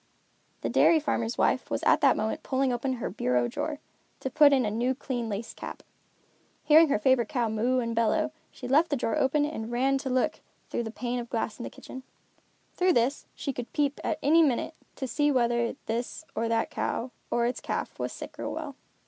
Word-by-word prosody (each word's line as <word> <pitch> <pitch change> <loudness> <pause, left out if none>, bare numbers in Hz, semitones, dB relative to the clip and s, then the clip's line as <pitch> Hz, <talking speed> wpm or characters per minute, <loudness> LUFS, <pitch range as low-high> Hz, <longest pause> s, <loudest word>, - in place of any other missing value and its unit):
The - - -2
dairy 325 - +5
farmer's 235 -6 -1
wife - - +1
was - - -2
at - - +4
that - - +5
moment 220 0 -2
pulling 265 -1 0
open 260 +2 -1
her 240 - -3
bureau 125 - +1
drawer, 295 - -3 0.4
to 265 - -3
put 300 -2 +6
on 265 -4 +3
a 210 - -1
new 245 +4 0
clean 245 -4 -3
lace 215 +2 -4
cap. - - -8 0.8
Hearing 315 +1 +6
her 280 - +3
favorite 235 0 +2
cow 240 -3 0
moo 230 +4 +1
and 230 -2 -1
bellow, 295 +8 +1 0.2
she 250 - -9
left 300 +6 +4
the 290 - +1
drawer 235 -3 -1
open 290 +2 +2
and 235 -7 -5
ran 270 +3 +2
to 265 - -4
look 255 0 +1 0.3
through 235 - -1
the - - -4
pane 240 +2 -3
of 235 -1 -6
glass 220 -2 -2
in - - -5
the - - -5
kitchen. 260 - -10 0.7
Through 365 0 +3
this, 245 +3 +1
she 275 - -3
could 245 -1 -6
peep, 290 -2 0
at - - -1
any 320 +4 +5
minute, 290 +1 +1 0.2
to 270 - -4
see 290 +4 +1
whether 235 -2 +1
this 240 +7 -3
or 230 - -1
that 230 0 0
cow, 250 +2 -2 0.2
or 235 - +1
its 245 - -2
calf, - - -4
was - - -2
sick - - -9
or - - -3
well. - - -5
250 Hz, 210 wpm, -28 LUFS, 230-280 Hz, 0.8 s, put